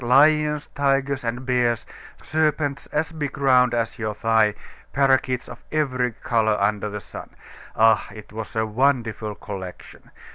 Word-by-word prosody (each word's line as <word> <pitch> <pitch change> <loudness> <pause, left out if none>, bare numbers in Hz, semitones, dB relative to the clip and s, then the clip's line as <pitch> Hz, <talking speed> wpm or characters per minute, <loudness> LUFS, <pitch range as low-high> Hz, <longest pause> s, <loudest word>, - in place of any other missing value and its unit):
Lions, 150 +4 +4
tigers, 140 -1 +1
and 120 +2 -3
bears, 125 -2 +1 0.4
serpents 150 -2 0
as 160 +2 -1
big 145 -4 -4
round 125 -3 +4
as 115 +1 -2
your 110 -1 -2
thigh, 110 -1 +2 0.4
parrakeets 130 -2 +2
of - - -10
every 130 -5 0
color 110 -1 0
under 105 +1 0
the 105 0 -5
sun. - - -10 0.5
Ah! 110 -1 +4
it 105 -1 -12
was 110 0 -7
a 110 0 +1
wonderful 115 -3 0
collection. 95 -4 -9
125 Hz, 140 wpm, -23 LUFS, 110-140 Hz, 0.5 s, Lions